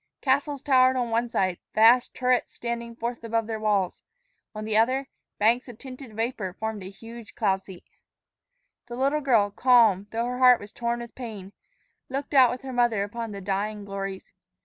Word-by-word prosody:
Castles 280 +1 0
towered 260 -2 +4
on 245 -2 -1
one 235 +1 0
side, 185 -5 0 0.2
vast 230 +3 +5
turrets 250 -1 +1
standing 235 -1 -5
forth 235 0 -4
above 230 0 -1
their 220 0 -4
walls; 205 -4 0 0.5
on 215 0 -5
the 215 -1 -1
other, 255 +5 +2 0.3
banks 235 +5 +2
of 235 - -10
tinted 255 -3 -10
vapor 225 -5 -3
formed 220 +1 -4
a 185 - -7
huge 225 +3 -12
cloud 195 -4 0
seat. 185 -3 -12 1.0
The 240 - -7
little 275 +4 +1
girl, 225 -7 +3
calm, 225 -6 +4
though 230 +1 -2
her 250 +1 -3
heart 250 -2 +7
was 205 +1 -11
torn 235 0 -2
with 235 -1 -9
pain, 210 -6 -8 0.6
looked 275 +2 -4
out 260 -3 +7
with 250 +2 -5
her 265 -1 -6
mother 240 -4 +2
upon 230 +2 -5
the 200 -1 -7
dying 205 +2 -3
glories. 195 -1 -6
230 Hz, 180 wpm, -26 LUFS, 210-250 Hz, 1.0 s, heart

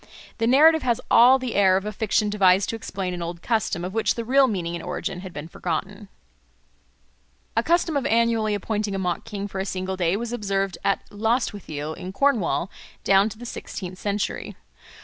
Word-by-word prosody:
The 225 - +1
narrative 310 +5 +6
has 240 -3 +1
all 250 +3 +7
the 255 -3 -4
air 190 -2 +4
of 195 - -4
a 210 - -2
fiction 210 0 0
devised 190 -2 +4
to - - -2
explain 190 -4 -4
an 175 - -5
old 170 0 -6
custom, 220 -7 0
of 185 - -5
which 225 0 +1
the 230 - -4
real 270 +3 +5
meaning 175 -7 -2
and 170 - -6
origin 190 -3 -4
had 185 0 -8
been 150 -1 -7
forgotten. 195 +5 -4 1.5
A - - +3
custom 340 -2 +1
of 280 - 0
annually 225 -2 +2
appointing 205 0 -2
a - - -1
mock 180 -2 -2
king 205 -3 -5
for 195 -1 -6
a - - 0
single 190 -1 -3
day 175 +1 +1
was 235 +1 -4
observed 195 -5 -2
at 195 - +1
Lostwithiel 205 - -2
in 185 +2 -8
Cornwall 220 -8 +1 0.3
down 195 +2 +4
to 215 - -10
the 240 - -9
sixteenth 185 -5 -7
century. 205 0 -3
205 Hz, 190 wpm, -24 LUFS, 185-230 Hz, 1.5 s, all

